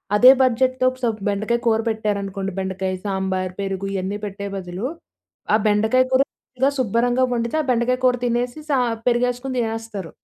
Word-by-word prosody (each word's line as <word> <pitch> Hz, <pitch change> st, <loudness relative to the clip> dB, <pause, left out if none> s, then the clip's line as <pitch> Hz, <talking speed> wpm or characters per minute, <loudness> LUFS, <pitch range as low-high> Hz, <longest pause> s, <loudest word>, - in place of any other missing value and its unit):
అదే 250 Hz, +5 st, +9 dB
బడ్జెట్‌తో, 255 Hz, +1 st, +2 dB, 0.4 s
బెండకాయ 215 Hz, +4 st, 0 dB
కూర 220 Hz, -1 st, +3 dB
పెట్టారనుకోండి. 200 Hz, -3 st, -2 dB
బెండకాయ, 190 Hz, 0 st, -2 dB
సాంబార్, 190 Hz, -2 st, -1 dB
పెరుగు 195 Hz, 0 st, -3 dB
ఇవన్నీ 195 Hz, +2 st, -2 dB
పెట్టే 200 Hz, 0 st, -5 dB
బదులు, 185 Hz, +5 st, -4 dB, 0.7 s
ఆ -, -, +7 dB
బెండకాయ 220 Hz, +5 st, +3 dB
కూర 260 Hz, -, +5 dB, 0.6 s
శుభ్రంగా 245 Hz, +2 st, +2 dB
వండితే, 235 Hz, +3 st, -1 dB
ఆ -, -, -7 dB
బెండకాయ 245 Hz, +1 st, +1 dB
కూర 250 Hz, -1 st, +4 dB
తినేసి 245 Hz, +3 st, -1 dB
సా 275 Hz, -, +3 dB, 0.3 s
పెరిగేసుకొని 245 Hz, +2 st, 0 dB
తినేస్తారు. 225 Hz, -6 st, -4 dB
220 Hz, 135 wpm, -22 LUFS, 195-245 Hz, 0.7 s, అదే